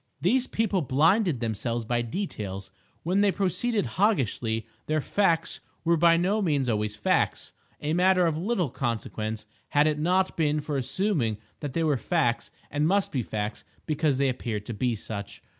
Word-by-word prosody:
These 245 +8 +2
people 210 -4 0
blinded 160 - +3
themselves 115 +1 -2
by 120 +1 0
details. 105 - -5 0.3
When 185 +5 +2
they 205 -1 +4
proceeded 205 +3 0
Hoggishly, 120 - 0 0.2
their 155 0 +1
"facts" 165 0 +1 0.2
were 170 0 +3
by 165 +1 +5
no 195 +5 +1
means 145 -8 +1
always 105 -2 0
facts—a 145 +7 -1
matter 180 +1 +4
of 165 -2 +1
little 180 - -1
consequence 110 -3 -3 0.2
had 145 +1 +4
it 155 -1 +1
not 185 +4 +2
been 150 -2 +1
for 150 0 -3
assuming 135 - 0 0.2
that 145 -4 -5
they 165 - 0
were 150 -3 +2
facts 135 -4 0 0.2
and 145 +1 +1
must 195 +2 +2
be 130 - 0
facts 105 -1 -4 0.2
because 150 -3 +1
they 140 0 +2
appeared 115 -5 -3
to 115 - -5
be 120 +2 0
such. 100 -1 -7
150 Hz, 160 wpm, -27 LUFS, 115-180 Hz, 0.3 s, by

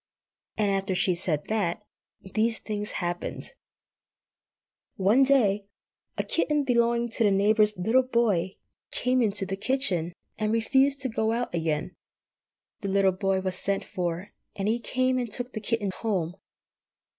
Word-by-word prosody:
And 210 -2 +2
after 195 -1 -1
she 185 - +3
had 170 - -2
said 155 -5 -1
that, 210 -1 -1 0.5
these 225 +1 +2
things 210 -1 -4
happened: 175 0 -4 1.4
One 205 +7 +3
day 215 -8 +3 0.5
a - - 0
kitten 300 -3 0
belonging 235 -2 +2
to 230 +1 +1
the 210 - +5
neighbour's 210 +1 +3
little 225 +8 +3
boy 225 -8 +1 0.4
came 250 +1 +1
into 205 -3 +2
the 195 +1 -3
kitchen, 195 -7 0 0.3
and 215 0 0
refused 270 +4 +3
to 260 - 0
go 220 0 0
out 240 +1 -2
again. 165 +1 -1 0.8
The 200 - -4
little 195 0 +3
boy 190 0 0
was 185 -1 -2
sent 200 0 -1
for, 175 +1 -4 0.2
and 195 0 -2
he 225 +2 +1
came 255 +1 0
and 240 -3 -3
took 245 +3 -2
the 215 - -4
kitten 210 -2 -1
home. 185 -7 -1
210 Hz, 150 wpm, -27 LUFS, 190-235 Hz, 1.4 s, the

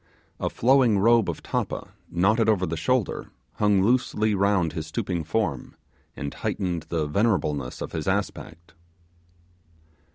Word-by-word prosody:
A - - -1
flowing 125 -3 +3
robe 115 +2 +4
of - - -5
tappa, - - -3 0.2
knotted 110 +6 +2
over 95 -4 +2
the 85 -1 -3
shoulder, 125 +5 -1 0.3
hung 105 -2 +3
loosely 110 -2 +2
round 100 -5 +2
his 80 -2 -5
stooping 85 +2 -2
form, 80 - -2 0.4
and 70 - -5
heightened 90 -4 -3
the 80 -3 -1
venerableness 75 - 0
of - - -7
his 80 -2 -4
aspect. 95 -3 -3
95 Hz, 130 wpm, -25 LUFS, 80-110 Hz, 0.4 s, robe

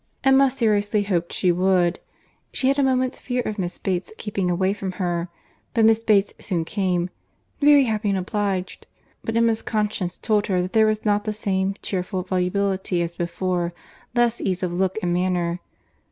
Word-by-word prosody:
Emma 270 0 +5
seriously 210 -4 +1
hoped 175 -4 -1
she 180 - +2
would. 180 0 +2 0.5
She 260 - +1
had 275 +1 +2
a - - +4
moment's 255 0 +1
fear 250 -1 -2
of 215 -1 -4
Miss 175 -1 -3
Bates 185 -2 -2
keeping 195 -4 -2
away 185 +2 +1
from 195 -2 -5
her. 175 -2 -2 0.5
But 225 -1 +4
Miss 225 0 +4
Bates 205 -3 +3
soon 170 -5 -2
came—"Very 195 - +1
happy 215 -3 -1
and 195 - +1
obliged"—but 195 +3 -4
Emma's 230 -1 +3
conscience 210 -5 -2
told 210 -2 +1
her 185 -2 +1
that 185 - -6
there 220 -1 +5
was 215 0 -1
not 205 0 +2
the 215 - -1
same 195 -2 -1
cheerful 185 0 -2
volubility 185 0 0
as 170 0 -5
before—less 180 +7 -2
ease 185 -1 -1
of 175 -1 -1
look 190 +2 0
and 175 -1 +1
manner. 175 -1 0
195 Hz, 165 wpm, -23 LUFS, 180-220 Hz, 0.5 s, Emma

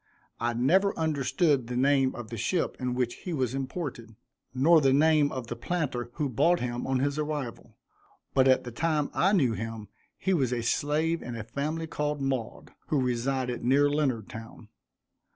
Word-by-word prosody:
I 120 0 -1
never 185 +12 +3
understood 150 -3 +1
the 125 0 -3
name 135 0 +3
of 120 -3 -8
the 115 - -4
ship 170 - 0
in 125 -1 -2
which 125 -1 -1
he 180 - -5
was 130 -5 -1
imported, 135 -5 -5 0.4
nor 155 +5 +5
the 135 -2 +4
name 150 0 +4
of 130 -2 -4
the 120 - -5
planter 125 -4 -2
who 150 - -1
bought 165 +8 +2
him 120 0 -3
on 135 0 +1
his 140 +3 0
arrival, 150 -6 -4 0.6
but 135 -1 +4
at 130 - +4
the 120 - -7
time 150 +3 0
I 190 - +3
knew 140 - +3
him 115 -1 -6 0.3
he 190 - 0
was 135 -8 +1
a 120 -1 -2
slave 155 +6 0
in 120 - -6
a 115 - -5
family 150 +8 -3
called 150 -2 -2
Maud, 135 -4 -3 0.2
who 150 - +1
resided 125 0 -1
near 140 +4 +4
Leonardtown. 115 -6 -3
135 Hz, 175 wpm, -28 LUFS, 120-150 Hz, 0.6 s, nor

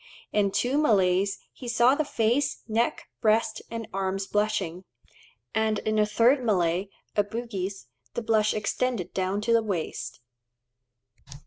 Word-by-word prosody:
In 205 -1 +3
two 250 +8 +1
Malays 195 -7 +3 0.2
he 250 - -9
saw 240 +2 +4
the 310 - +1
face, 245 0 0
neck, 230 +2 0 0.2
breast, 220 +1 +2
and 230 -1 -5
arms 195 0 -1
blushing; 195 -4 -1 0.7
and 220 -1 +1
in 215 0 0
a 210 - +3
third 240 +5 +3
Malay 185 -3 +1 0.3
(a 205 - +4
Bugis) 200 - -5 0.3
the 235 - -2
blush 220 -1 +3
extended 215 -2 -1
down 190 +2 -1
to 230 +2 +1
the 230 - +5
waist. 195 - -4
215 Hz, 135 wpm, -27 LUFS, 195-230 Hz, 0.7 s, the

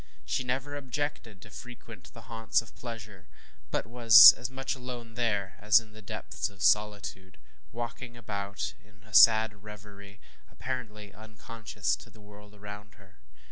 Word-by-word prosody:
She 130 - -2
never 130 +3 -4
objected 135 -7 -5
to 110 - -15
frequent 115 -6 -12
the 115 - -13
haunts 115 -1 -1
of 115 - -18
pleasure, 110 -6 -10 0.4
but - - -2
was 115 -2 +9
as 120 0 -6
much 135 0 -4
alone 125 -3 -9
there 105 -5 -2
as 105 +2 +5
in 110 -1 -16
the 110 - -13
depths 100 - -5
of 100 -2 -10
solitude; 100 -3 0 0.3
walking 120 +1 -7
about 100 -3 -5
in 105 0 -25
a 110 -1 -20
sad 110 -3 +5
revery, 100 -1 -13 0.3
apparently 105 -6 -7
unconscious 110 - -5
of - - -20
the 110 - -18
world 105 0 -16
around 105 0 -11
her. 100 -2 -22
110 Hz, 150 wpm, -28 LUFS, 105-120 Hz, 0.4 s, was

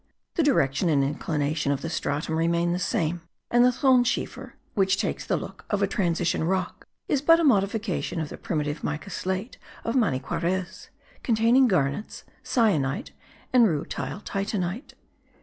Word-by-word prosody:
The - - +1
direction 170 - +2
and 140 -3 +3
inclination 150 0 -1
of 140 -1 -1
the - - -2
stratum 155 +1 -2
remain 170 +1 +1
the 180 - -1
same, 175 -4 -1 0.3
and 240 0 +5
the 250 - +6
thonschiefer, 255 0 +1 0.2
which 195 -1 +2
takes - - -2
the - - 0
look - - -8
of 205 -2 +1
a - - +3
transition 170 -4 0
rock, 185 +1 -2 0.2
is 285 - +1
but 330 +3 +6
a - - +1
modification 205 - +1
of 155 -2 -3
the - - -8
primitive 150 -2 -3
mica 150 +6 -4
slate 190 +7 -3 0.2
of 230 - -2
Maniquarez, 180 - -1 0.3
containing 235 +3 +4
garnets, 150 - -1 0.2
cyanite, 160 - +1 0.4
and 240 -3 +6
rutile 170 +4 -3
titanite. 200 - -3
185 Hz, 150 wpm, -26 LUFS, 160-230 Hz, 0.4 s, the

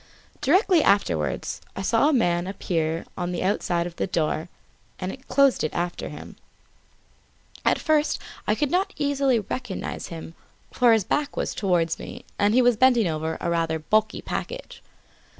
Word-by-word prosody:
Directly 360 - +4
afterwards 85 - +1
I 195 - -4
saw 230 +8 +3
a - - +2
man 175 -8 +2
appear 165 -4 -2
on 175 0 -3
the 175 - -2
outside 175 -3 0
of 175 -1 -7
the - - -1
door, 160 -1 -1 0.5
and 195 +9 -6
close 275 -2 +3
it 155 - -2
after 175 0 -2
him. - - -10 1.3
At - - +3
first 305 -1 +1 0.3
I - - +3
could 295 -2 -1
not 385 +2 0
recognise 260 -6 -1
him, 165 -1 -8 0.4
for 240 -2 +4
his 220 -3 +3
back 295 +9 -1
was - - -1
towards 175 -5 +1
me - - -9
and 205 +2 +3
he 255 - +5
was 240 -2 +4
bending 245 -4 +4
over 160 0 -2
a 170 - -1
rather 165 -1 0
bulky 215 +7 0
package. - - -5
200 Hz, 155 wpm, -25 LUFS, 170-260 Hz, 1.3 s, he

